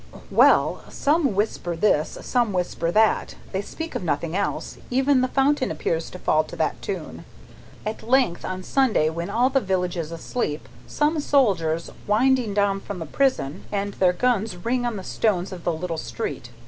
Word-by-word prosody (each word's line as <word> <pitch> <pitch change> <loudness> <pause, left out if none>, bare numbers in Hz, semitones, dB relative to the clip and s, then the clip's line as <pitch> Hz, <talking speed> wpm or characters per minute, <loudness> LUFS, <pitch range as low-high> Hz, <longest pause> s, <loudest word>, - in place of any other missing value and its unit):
"Well! - - +4
Some 290 - +1
whisper 195 -4 -1
this, 165 -4 +1
some 240 -5 +1
whisper 175 -2 -1
that; 215 +4 +2 0.2
they 190 - -1
speak 325 +10 -7
of - - -3
nothing 160 0 -1
else; 200 0 -2
even 265 +1 +3
the 255 - +2
fountain 270 0 +2
appears 165 0 -2
to - - -9
fall 155 -3 +2
to - - -9
that - - -1
tune. - - -5 0.6
At 215 +1 -4
length, 245 -7 +2
on 185 0 -4
Sunday 225 - +2
night - - -6
when 170 +1 -3
all 250 +3 +2
the 270 0 +3
village 185 -3 -1
is 165 -1 -4
asleep, 165 -2 -3 0.3
come 305 +1 +2
soldiers, 185 - +1 0.2
winding 235 0 +2
down 200 -1 +2
from 200 0 -7
the 165 - -5
prison, 255 - 0
and 200 0 -2
their 185 -2 +3
guns 220 -1 0
ring 240 +6 -1
on 235 - -2
the 190 - -6
stones 190 -2 0
of 180 -2 -8
the 175 - +2
little 165 0 -3
street. - - -5
200 Hz, 180 wpm, -24 LUFS, 175-250 Hz, 0.6 s, Well